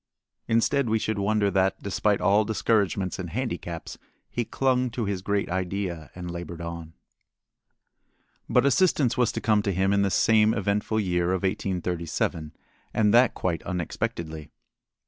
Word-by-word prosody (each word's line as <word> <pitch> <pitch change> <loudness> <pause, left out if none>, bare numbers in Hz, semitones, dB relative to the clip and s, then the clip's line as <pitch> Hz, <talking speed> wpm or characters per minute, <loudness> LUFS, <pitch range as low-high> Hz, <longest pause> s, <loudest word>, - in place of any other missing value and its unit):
Instead 115 +3 +2
we 110 - +3
should 110 -1 -2
wonder 100 0 +1
that, 95 0 +1
despite 100 +1 +1
all 105 +2 +4
discouragements 100 -3 0
and 90 -2 -4
handicaps, 105 -7 -5 0.3
he 120 - -1
clung 130 +1 +1
to 115 -1 -3
his 100 -2 -2
great 100 +1 -1
idea 90 -2 -3
and 90 -1 -6
labored 85 -1 -7
on. 85 -1 -7 1.6
But - - +3
assistance 140 -4 +3
was 125 -3 +2
to - - -3
come 105 -2 +3
to 100 -1 -1
him 95 +2 +1
in 100 - +3
this 100 -1 +1
same 110 0 +4
eventful 105 +1 0
year 90 -3 0
of 95 - -2
1837, 85 -4 -2 0.4
and 105 -2 +3
that 120 +1 +5
quite 85 -3 -2
unexpectedly. 80 -3 -4
100 Hz, 145 wpm, -26 LUFS, 90-110 Hz, 1.6 s, that